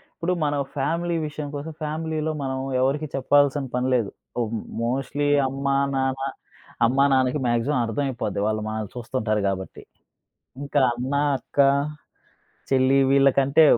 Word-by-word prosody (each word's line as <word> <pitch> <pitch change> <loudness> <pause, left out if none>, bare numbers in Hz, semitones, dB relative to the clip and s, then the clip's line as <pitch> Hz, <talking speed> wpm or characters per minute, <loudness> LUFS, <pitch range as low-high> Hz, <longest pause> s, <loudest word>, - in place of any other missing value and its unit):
ఇప్పుడు 180 +1 -1
మనం 145 -1 0
ఫ్యామిలీ 170 +5 -1
విషయం 150 0 -6
కోసం 150 +3 -5
ఫ్యామిలీలో 155 0 -2
మనం 130 -1 -2 0.2
ఎవరికీ 145 +4 +1
చెప్పాల్సిన 145 +1 +3
పని 125 +1 0
లేదు. 115 -5 +1 0.5
మ్ - - -3 0.2
మోస్ట్‌లీ 135 +4 -1 0.2
అమ్మ 135 +1 -5 0.3
నాన్న, 135 0 -1 0.6
అమ్మ 130 +4 +1
నాన్నకి 130 +2 +2
మాక్సిమం 120 +4 +1
అర్థం 115 +6 -1
అయిపోద్ది 120 -6 -3
వాళ్ళు 110 0 -1
మనల్ని 110 -2 -4
చూస్తుంటారు 115 -3 -1
కాబట్టి. 95 -1 -4 0.8
ఇంకా 145 0 +1
అన్న, 125 +3 -4 0.2
అక్క, 130 - -9 1.1
చెల్లి 135 0 +4
వీళ్ళకంటే 140 +2 +4
135 Hz, 125 wpm, -24 LUFS, 125-145 Hz, 1.1 s, చెల్లి